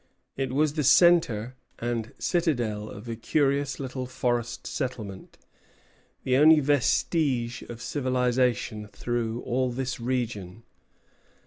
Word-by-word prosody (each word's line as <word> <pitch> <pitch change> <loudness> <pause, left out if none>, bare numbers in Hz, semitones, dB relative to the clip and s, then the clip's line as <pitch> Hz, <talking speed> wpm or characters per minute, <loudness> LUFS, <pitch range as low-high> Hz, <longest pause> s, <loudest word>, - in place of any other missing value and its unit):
It 135 -2 -2
was 145 +2 +2
the 150 -1 -1
centre 145 -8 +4 0.2
and 115 -2 -3
citadel 120 - -1
of 105 +4 -10
a 115 - -3
curious 140 +3 0
little 130 -1 -4
forest 120 -2 -2
settlement, 110 -8 -5 0.9
the 130 0 +2
only 155 +2 +7
vestige 135 -3 +1
of 115 0 -8
civilization 125 -5 0
through 120 +1 -3
all 130 +1 0
this 130 +1 -3
region. 115 -5 -3
125 Hz, 110 wpm, -27 LUFS, 115-140 Hz, 0.9 s, only